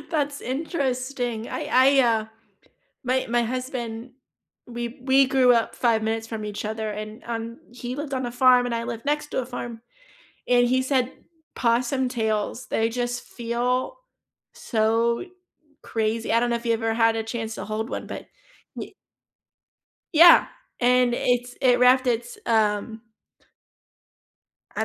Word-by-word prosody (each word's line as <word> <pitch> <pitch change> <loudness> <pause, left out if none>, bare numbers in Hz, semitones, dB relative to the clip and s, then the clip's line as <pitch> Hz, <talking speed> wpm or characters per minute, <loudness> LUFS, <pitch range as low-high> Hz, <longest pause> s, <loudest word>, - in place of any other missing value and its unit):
That's 290 -3 -1
interesting. 255 -4 -3
I - - -4
I, 270 +2 +5
uh 225 -3 +2 0.8
my 255 +1 0
my 240 0 +2
husband 245 -1 -4 0.6
we 240 0 -5
we 270 +1 +4
grew 255 -2 +4
up 230 -1 0
5 225 -3 +2
minutes 225 0 -2
from 220 -2 -5
each 205 0 -5
other 220 0 -3
and, 215 +1 -7
um, 230 0 -5
he 245 +1 -6
lived 290 -1 -5
on 255 -2 -1
a - - -5
farm 250 0 +5
and 235 - -2
I 230 - -2
lived 230 -1 -5
next 295 +1 -1
to - - -1
a - - -6
farm 240 -2 -7 0.7
and 245 -1 +4
he 260 +1 +2
said 260 -1 +1 0.4
possum 250 +2 +1
tails, 220 0 -2
they 225 0 0
just 245 0 -3
feel 245 - -2 0.6
so 230 +4 0 0.6
crazy. 225 0 -2
I 230 - +4
don't 240 0 0
know 235 - +1
if 235 +1 -7
you 230 - +3
ever 225 0 -1
had 225 0 +3
a 225 - -1
chance 225 0 -5
to - - -6
hold 215 +2 -3
one, - - -5
but - - -7 0.5
ye - - -7 1.2
Yeah. 340 +2 +8 0.3
And, 250 0 +4
it's 245 0 0
it 250 -2 +4
wrapped 255 +1 +5
its, 240 0 -1
um 220 0 +1 1.8
I - - 0
240 Hz, 150 wpm, -24 LUFS, 225-255 Hz, 1.8 s, Yeah